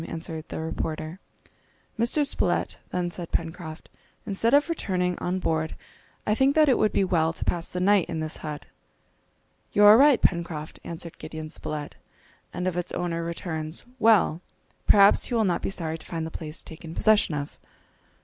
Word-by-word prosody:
answered 160 -1 -5
the - - -5
reporter. 160 +1 -4 0.8
"Mr. 245 +6 +2
Spilett," - - 0
then 175 -1 -2
said 175 -1 -6
Pencroft, 165 -1 -4 0.4
"instead 210 +3 +1
of 290 +2 +5
returning 185 - -1
on 180 +1 -1
board, 160 -3 -1 0.5
I 210 - +2
think 265 +5 +3
that 310 -1 +5
it 260 - +4
would 215 - +3
be - - +2
well 165 -3 +2
to - - -5
pass 170 -1 -1
the 180 - -3
night 195 0 +3
in 160 - -3
this 155 0 -3
hut." 150 -2 -6 1.1
"You 205 - +4
are 210 +3 +9
right, 280 -3 +6
Pencroft," 170 -3 -1
answered 170 0 -7
Gideon 155 -1 -7
Spilett, 150 -1 -5 0.5
"and 180 - -3
if 185 - -1
its 175 0 -2
owner 170 -1 -2
returns, 165 -1 -4
well! 215 -7 +4 0.5
perhaps 200 0 +6
he 245 - -2
will 225 - +3
not 180 -3 0
be - - -2
sorry 165 -4 -3
to - - -10
find 165 -2 -3
the 160 - -6
place 155 -1 -6
taken 160 0 -10
possession 215 -7 +3
of." 145 0 -5
175 Hz, 175 wpm, -26 LUFS, 160-205 Hz, 1.1 s, are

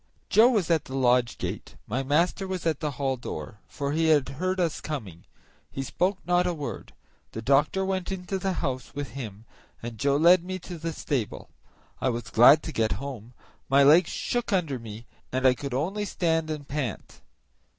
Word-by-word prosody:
Joe 225 +3 +7
was 205 -9 +1
at 160 -3 +2
the 130 - -7
lodge 125 -2 +2
gate; - - -5
my 125 +5 -2
master 170 +8 +1
was 185 -2 -4
at 160 -4 +1
the 150 - -1
hall 135 -2 0
door, 105 -3 -7
for 140 0 -3
he 160 +2 +1
had 150 -4 +4
heard 185 +7 -2
us 170 -4 0
coming. 105 - -6 0.4
He 135 - -4
spoke 185 +8 0
not 180 0 +2
a 175 - -1
word; 145 -3 -6 0.4
the 110 - -5
doctor 145 +9 +2
went 190 -1 -2
into 190 0 -3
the 190 0 -1
house 130 -6 -4
with 145 -1 -4
him, 110 -5 -8 0.3
and 115 -2 -7
Joe 140 +3 +2
led 170 +3 +6
me 185 +1 -4
to 175 -1 -9
the 165 +1 -3
stable. 135 -7 -3 0.5
I 130 - +2
was 115 -2 -4
glad 140 +6 +7
to - - -5
get 110 -1 +1
home; 125 -4 -7 0.3
my 140 +1 +6
legs 155 +4 +6
shook 240 -1 -2
under 165 -9 0
me, 115 0 -9 0.3
and 130 +1 -1
I 130 - +7
could 135 0 -5
only 195 +10 -1
stand 165 -4 0
and 150 -2 -5
pant. 135 - -5
145 Hz, 190 wpm, -26 LUFS, 130-175 Hz, 0.5 s, Joe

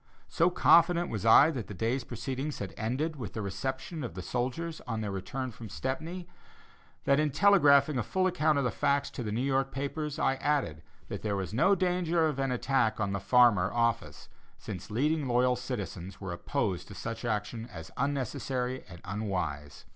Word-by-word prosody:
So 170 +2 +3
confident 175 0 +4
was 110 0 -2
I 145 +7 +8
that 125 -8 -5
the 105 - -7
day's 120 +7 -1
proceedings 135 +4 -4
had 100 -2 -5
ended 140 +9 -2
with 115 -6 -6
the 110 - -3
reception 130 - -4
of 120 - -6
the 90 - -5
soldiers 130 - -3
on 115 -2 -2
their 105 -2 -3
return 100 +7 -4
from 115 -1 -10
Stepney, 160 - -4 0.8
that 140 +1 +3
in 155 0 +2
telegraphing 145 -5 +5
a - - +2
full 185 - 0
account 155 -5 +2
of 140 - +1
the 125 - +1
facts 140 0 +1
to - - -6
the 105 -3 -3
New 115 +4 -1
York 135 0 +1
papers, 145 +2 -3
I 135 - +1
added 135 - 0 0.3
that - - -5
there 105 -2 -1
was 95 +1 -4
no 190 - +4
danger 175 -2 +1
of 150 -3 -1
an 135 -1 0
attack 125 -3 +1
upon 100 -2 -1
the 100 - -1
Farmer 100 -2 +4
office, 115 -1 -1 0.3
since 90 - -7
leading 145 +6 0
loyal 125 +1 +3
citizens 100 -7 -6
were 95 -3 -5
opposed 90 +1 -2
to 100 - -10
such 115 +5 -5
action 110 0 -2
as 80 -2 -9
unnecessary 130 -1 -2
and 85 -2 -11
unwise. 90 -8 -4
125 Hz, 185 wpm, -30 LUFS, 105-145 Hz, 0.8 s, I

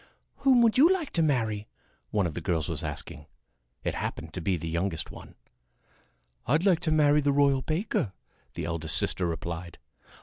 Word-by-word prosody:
"Whom 260 -3 +5
would 230 +2 +3
you 325 +6 +7
like 360 -6 -1
to 165 - +1
marry?" 110 -9 0 0.4
one 100 -3 +1
of 85 - -2
the 90 - -5
girls 80 -2 -1
was 80 -1 -3
asking. 75 0 -6 0.6
It - - -1
happened 80 -1 -5
to 90 - -4
be 90 +2 0
the 80 - -6
youngest 85 0 -2
one. - - -12 1.1
"I'd 150 +8 +2
like 185 -5 +4
to 175 -3 -1
marry 150 -1 +4
the 145 0 +2
royal 140 -1 +3
baker," 155 - -1 0.4
the - - -3
eldest 80 -1 0
sister 90 - 0
replied. 85 +1 -5
105 Hz, 175 wpm, -28 LUFS, -, 1.1 s, you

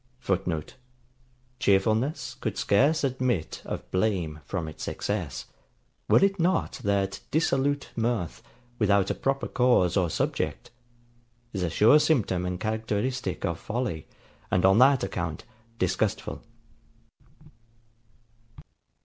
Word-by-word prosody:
[Footnote: 90 - -2 0.8
Cheerfulness 110 +6 +1
could - - -2
scarce 145 +10 +3
admit 130 - -1
of - - -6
blame 95 -6 0
from 85 +1 -3
its 80 - -7
excess, 75 - -3 0.6
were - - +6
it 195 -1 -1
not 180 +3 +1
that 100 -1 0
dissolute 145 -2 0
mirth, 115 -7 -1 0.4
without 100 -2 +3
a - - +1
proper 135 0 -1
cause 125 -9 +3
or 90 -4 +2
subject, - - -2 0.8
is 95 - -3
a 90 - 0
sure 110 - +6
symptom 115 - +1
and 90 0 -3
characteristic 110 +1 -2
of 85 -1 -2
folly, 110 - -3 0.4
and 90 0 +2
on 95 +3 +6
that 135 0 +5
account 85 -5 -3 0.3
disgustful. 95 -4 -1
105 Hz, 110 wpm, -27 LUFS, 90-130 Hz, 0.8 s, were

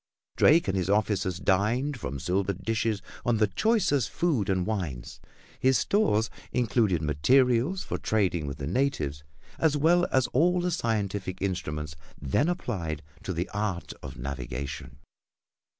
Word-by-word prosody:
Drake 165 -2 +5
and 95 - 0
his 95 -1 -1
officers 100 -3 +1
dined 115 +10 +1
from 70 - -4
silver 95 +5 0
dishes 105 +2 -1 0.2
on 120 -2 +2
the 110 - +4
choicest 175 - +1
food 150 - 0
and 95 -2 +1
wines. 85 - -4 0.4
His 130 0 +4
stores 110 - +2 0.2
included 110 -8 +1
materials 125 - +3
for - - -4
trading 90 -8 0
with 70 0 -5
the 70 - -5
natives, 80 - -1 0.4
as 155 -2 +3
well 175 +4 +4
as 130 -1 +3
all 180 +7 +3
the 180 0 0
scientific 100 - -2
instruments 75 -6 -3 0.2
then 70 - +1
applied 85 - -3 0.2
to - - -4
the 85 +1 -2
art 100 -4 -3
of 65 0 -8
navigation. 65 0 -5
100 Hz, 140 wpm, -27 LUFS, 85-130 Hz, 0.4 s, Drake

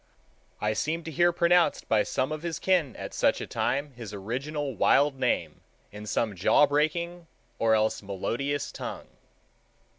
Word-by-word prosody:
I 105 0 0
seem 160 +9 -2
to 160 - -6
hear 175 +3 +3
pronounced 170 0 +2
by 110 -1 +3
some 130 +6 -1
of 155 -1 -4
his 170 -1 -3
kin 170 -9 +1
at - - -7
such - - +2
a - - -4
time 140 +4 -1
his 115 -5 -8
original 135 +8 -3
wild 140 -2 +3
name - - -1 0.3
in 105 +1 -9
some 110 -1 -1
jaw 95 - +5
breaking 165 +4 -1 0.3
or 110 -1 +4
else 110 0 +1
melodious 120 +9 -3
tongue. - - -7
145 Hz, 155 wpm, -27 LUFS, 110-165 Hz, 0.3 s, jaw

